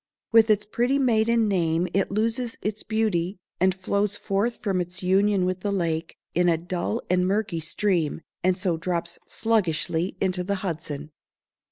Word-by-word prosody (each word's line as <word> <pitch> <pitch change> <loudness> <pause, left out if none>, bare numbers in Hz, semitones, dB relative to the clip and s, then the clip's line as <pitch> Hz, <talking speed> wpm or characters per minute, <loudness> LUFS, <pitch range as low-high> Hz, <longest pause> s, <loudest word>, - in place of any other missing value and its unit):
With 225 -1 +6
its 210 -1 +3
pretty 240 +5 +1
maiden 230 -3 +3
name 170 -3 +1
it 195 0 +1
loses 225 +3 -1
its 210 0 -2
beauty, 210 -4 0 0.2
and 185 0 +3
flows 200 +2 0
forth 205 +4 -1
from 190 -4 0
its 180 +1 -5
union 195 +1 +3
with 185 0 -1
the 200 +2 -2
lake, 165 -3 -1 0.2
in 175 0 +3
a 165 - +3
dull 175 +6 -3
and 180 0 +2
murky 200 -3 0
stream, 165 -1 0 0.2
and 185 0 +3
so 185 -4 0
drops 170 0 -2
sluggishly 180 -5 0
into 185 -1 0
the 200 +2 -1
Hudson. 155 -3 -4
190 Hz, 160 wpm, -25 LUFS, 175-215 Hz, 0.2 s, With